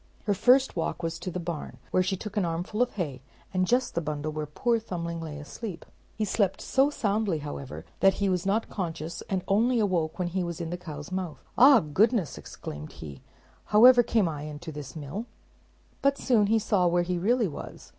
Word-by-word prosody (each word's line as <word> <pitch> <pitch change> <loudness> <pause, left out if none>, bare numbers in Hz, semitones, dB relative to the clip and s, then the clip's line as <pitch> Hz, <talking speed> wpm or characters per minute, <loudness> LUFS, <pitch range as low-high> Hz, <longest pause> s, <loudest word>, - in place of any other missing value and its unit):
Her 205 - +2
first 255 +7 +4
walk 170 0 -2
was 165 0 -2
to 175 - -4
the 180 - -4
barn, 170 -3 -5
where 185 - +3
she 190 +1 0
took 210 +2 -7
an 205 - +2
armful 175 +6 -2
of 250 - +1
hay, 145 -10 -4 0.3
and 185 -1 +1
just 250 +4 +2
the 170 - 0
bundle 150 0 -3
where 155 0 -4
poor 230 +10 +1
Thumbling 170 -5 -4
lay 155 -2 -6
asleep. 170 +5 -7 0.3
He 215 - -1
slept 195 -2 +1
so 270 +2 +2
soundly, 210 - 0
however, 145 -2 -7
that 195 0 +5
he 200 - 0
was 180 -2 +1
not 205 +4 +1
conscious, 165 -4 -4
and 190 -2 -1
only 230 +5 +3
awoke 175 -7 0
when 180 -1 -1
he 185 +1 -1
was 170 -1 -4
in 170 -1 -4
the - - -1
cow's 155 -3 -8
mouth. 185 -4 -4
"Ah, 260 0 +8
goodness!" 190 - +1
exclaimed 75 +1 -8
he, 70 -4 -9 0.4
"however 245 +4 +8
came 220 -5 +2
I 150 -3 -4
into 150 +2 -7
this 145 -2 -8
mill?" 160 - -5 0.7
but 275 0 +3
soon 220 -5 +3
he 225 +2 +4
saw 205 -4 +2
where 175 0 +2
he 175 0 -1
really 230 +4 +2
was. 150 - -9
180 Hz, 205 wpm, -28 LUFS, 160-215 Hz, 0.7 s, Ah